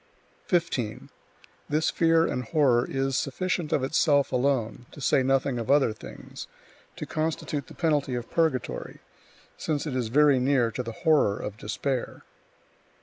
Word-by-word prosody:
15. 150 - -1 0.6
This 155 +2 +1
fear 165 0 +3
and 125 - -2
horror 125 -3 +3
is 135 0 -1
sufficient 170 +3 -2
of 135 - +1
itself 145 0 +2
alone 125 -3 0
(to - - -11
say 135 0 +3
nothing 135 -1 +1
of 115 - -5
other 140 -5 +4
things) - - -10 0.5
to - - -6
constitute 155 -3 -3
the - - -13
penalty 145 -6 0
of 120 -1 -4
purgatory, 160 -7 -1 0.6
since 150 -1 -2
it 145 -4 -3
is 125 -3 -1
very 140 +2 +4
near 125 -3 +2
to 120 - -3
the 115 -2 -5
horror 150 -11 +4
of 105 - -5
despair. 125 +5 -3
135 Hz, 145 wpm, -26 LUFS, 125-150 Hz, 0.6 s, other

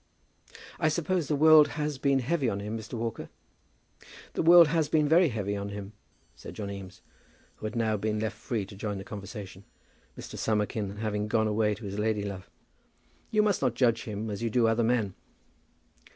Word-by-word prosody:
"I - - +2
suppose 170 0 -1
the 150 - +1
world 155 0 +7
has 150 -2 -2
been 140 -1 +2
heavy 140 -1 0
on 100 - -3
him, 105 +2 -4
Mr. 110 +1 -8
Walker?" 115 -1 -4 1.0
"The - - -1
world 170 -1 +8
has 160 -2 +1
been 155 -1 +3
very 165 +2 +5
heavy 100 -4 -2
on 100 0 -4
him," 100 0 -7 0.4
said - - -10
John 100 -2 -5
Eames, 95 -1 -9 0.5
who 110 - -4
had 110 - -7
now 110 -2 +1
been 105 +1 -1
left 110 0 -2
free 110 -2 -3
to 100 - -12
join 105 0 -4
the 95 - -6
conversation, 100 -2 -8 0.5
Mr. - - -8
Summerkin 105 -2 -1
having 105 -1 -2
gone 110 0 +1
away 105 0 +1
to 110 - -10
his 100 +1 -5
lady 105 -1 0
love. 100 -2 -6 0.8
"You 215 -1 +3
must 205 -3 +1
not 125 -3 +1
judge 115 -2 +2
him 105 0 -4
as 100 - -5
you 115 - 0
do 115 +1 +2
other 115 +1 +2
men." 110 -4 +1
110 Hz, 190 wpm, -28 LUFS, 105-140 Hz, 1.0 s, world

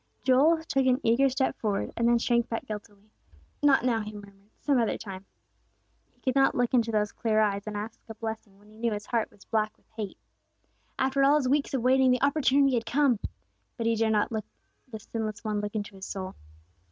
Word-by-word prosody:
Joel 305 +5 +4
took 270 -4 +1
an 255 0 +3
eager 250 +4 +4
step 265 +1 0
forward, 205 -3 -1
and 235 - +1
then 240 0 +5
shrank 235 0 +1
back 230 - -3
guiltily. 210 0 -9 0.5
"Not 275 -4 +4
now," 235 -3 +2
he 210 0 -7
murmured, 200 0 -13
"some 280 -3 +2
other 230 - 0
time." 195 -2 -9 0.9
He - - -34
could 260 - 0
not 270 0 +3
look 245 0 0
into 230 -2 +3
those 210 -1 0
clear 220 -2 0
eyes 205 -1 0
and 210 -1 -4
ask 215 +2 -6
a 225 - -7
blessing, 220 -3 -6
when 205 +1 -22
he 215 - -18
knew 230 -1 0
his 210 0 -5
heart 230 -2 -1
was 200 - -20
black 215 -1 -1
with - - -34
hate. 210 -4 -5 0.8
After 270 +1 +1
all 280 +2 +6
his 290 -4 +1
weeks 280 +1 +1
of 245 - -1
waiting 260 +1 +4
the 250 +1 +2
opportunity 280 -1 +3
had 230 -2 -1
come; 265 -3 +2 0.6
but 230 - -3
he 230 0 +2
dared 220 0 +1
not 210 +2 +1
let 215 -2 -3 0.4
the 220 -4 -8
Sinless 215 -1 -5
One 210 -2 -1
look 210 +1 -5
into 205 -1 -3
his 190 0 -8
soul. 190 -1 -5
225 Hz, 215 wpm, -28 LUFS, 210-260 Hz, 0.9 s, all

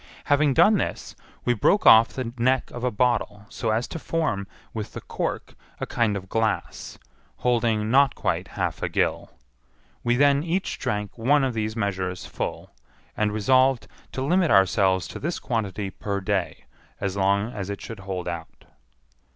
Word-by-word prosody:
Having 145 -1 +3
done 205 +6 +6
this, - - -4 0.3
we 120 - +3
broke 120 - +2
off 115 +1 +9
the 125 -3 -5
neck 130 +2 +1
of 120 - -7
a 125 - +2
bottle 105 -2 0
so 115 -2 -3
as 110 +3 0
to 165 - -5
form, 150 -14 -1 0.3
with 110 -2 -5
the - - -6
cork, - - -4 0.3
a - - -2
kind 115 -4 0
of 95 -1 -8
glass, 110 +1 -2 0.4
holding 115 -3 +1
not 135 0 +4
quite - - -1
half - - -2
a - - -1
gill. - - 0 0.7
We 120 0 +2
then 140 +2 +4
each 175 +4 -2
drank 105 -1 -3
one 140 +5 +3
of 130 -2 0
these 110 -1 -2
measures 95 -4 -2
full, - - -5 0.4
and 105 -1 +1
resolved 130 +4 +3 0.3
to 130 - -2
limit 175 +4 +2
ourselves 95 -1 +3
to - - -7
this 170 +4 -2
quantity 105 -4 -3
per 100 0 -3
day 95 -2 -2 0.3
as 100 -1 -2
long 100 +4 +1
as 100 -1 -5
it 100 - -4
should 115 -3 -8
hold 95 -2 -5
out. 85 -2 -7
110 Hz, 165 wpm, -25 LUFS, 100-130 Hz, 0.7 s, off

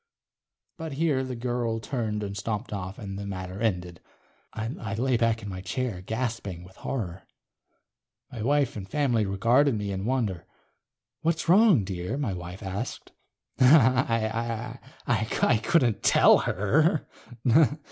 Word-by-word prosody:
But 160 -3 -5
here 145 -2 +1
the 130 -1 -5
girl 120 -1 -2
turned 110 -2 -3
and 100 -1 -5
stomped 105 +3 -4
off 95 0 -5
and 100 -3 -6
the 100 - -5
matter 95 0 -6
ended. 90 -6 -2 0.5
I 110 -2 -4
lay 130 +3 +1
back 115 -1 +1
in - - -6
my 95 -1 -6
chair 100 +1 -3
gasping 110 -4 -4
with 95 +1 -16
horror. 95 -8 -5 1.0
My 115 - -6
wife 140 +2 +1
and 95 -3 -7
family 125 -8 +1
regarded 120 +8 +3
me 105 -1 -3
in 95 0 -3
wonder. 115 -8 -1 0.7
"What's 165 +1 0
wrong, 190 - +6
dear?" 95 +5 -4
my 130 -9 -1
wife 90 +3 -7
asked. 100 +6 -5 0.5
I 115 -3 +3 0.8
couldn't 125 -9 +2
tell - - +6
her. 150 - +1
115 Hz, 130 wpm, -27 LUFS, 100-130 Hz, 1.0 s, wrong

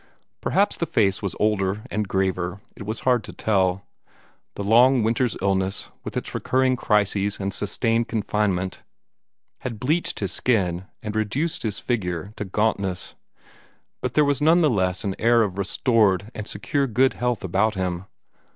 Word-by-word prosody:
Perhaps - - +2
the - - -1
face 100 -3 +2
was 100 -3 -3
older 105 -1 +1
and 105 0 -1
graver; 95 -1 -1 0.2
it 100 - -9
was 110 - -3
hard 125 -3 +2
to - - -8
tell. 95 -3 0 0.7
The 100 - -4
long 120 +4 +5
winter's 115 +2 +1
illness, 95 0 0
with - - -5
its - - -4
recurring 130 0 +2
crises 105 -3 +1
and 100 -1 -2
sustained 115 +4 0
confinement, 105 -4 -1 0.8
had 115 -4 -5
bleached 155 +8 0
his 100 - -1
skin 95 -7 0 0.2
and 105 0 -4
reduced 125 +10 -1
his 105 -3 -2
figure 95 -4 -2
to 105 - -3
gauntness, 100 -2 -1 0.9
but 125 -1 -3
there 150 - +5
was 145 0 +1
none 165 +3 +5
the 155 -4 +4
less 95 -4 0
an 95 -2 -2
air 115 +1 +4
of 100 -2 -3
restored 105 -1 +2
and 105 -1 -6
secure 140 +7 -1
good 130 +3 +3
health 125 -2 -1
about 100 +4 +1
him. 90 -1 -2
105 Hz, 160 wpm, -24 LUFS, 95-120 Hz, 0.9 s, long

